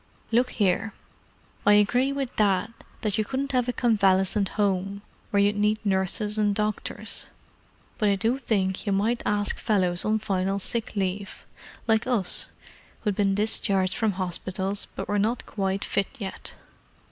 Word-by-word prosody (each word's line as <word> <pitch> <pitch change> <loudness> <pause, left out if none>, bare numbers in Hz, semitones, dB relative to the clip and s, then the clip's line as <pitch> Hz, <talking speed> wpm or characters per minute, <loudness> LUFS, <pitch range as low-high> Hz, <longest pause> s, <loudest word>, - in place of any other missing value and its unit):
"Look 245 +2 +3
here—I 205 0 -2
agree 245 +6 +4
with 275 -3 -3
Dad 205 +1 +2 0.3
that 210 -1 0
you - - +3
couldn't 270 +5 -2
have 250 -2 +1
a - - 0
convalescent 195 -4 +2
home, 200 0 0 0.3
where 205 - +2
you'd 205 +1 +2
need 210 +1 +2
nurses 200 +2 0
and 205 -1 +2
doctors; 210 0 -3 0.7
but 210 - +3
I 200 - +3
do 230 +6 0
think 195 -5 0
you 200 - +2
might 220 +5 +1
ask 205 0 0
fellows 180 -5 +2
on 215 +1 +2
final 195 -2 -1
sick 220 +3 -3
leave, 195 0 -3 0.4
like 220 -1 +2
us—who'd 210 -1 -2
been 195 -1 +2
discharged 200 -3 +1
from 220 -3 +1
hospitals, 190 +2 -3
but - - -4
were 205 0 +1
not 225 +4 0
quite 195 -1 -2
fit 195 - 0
yet. 200 -6 -7
205 Hz, 145 wpm, -26 LUFS, 195-220 Hz, 0.7 s, agree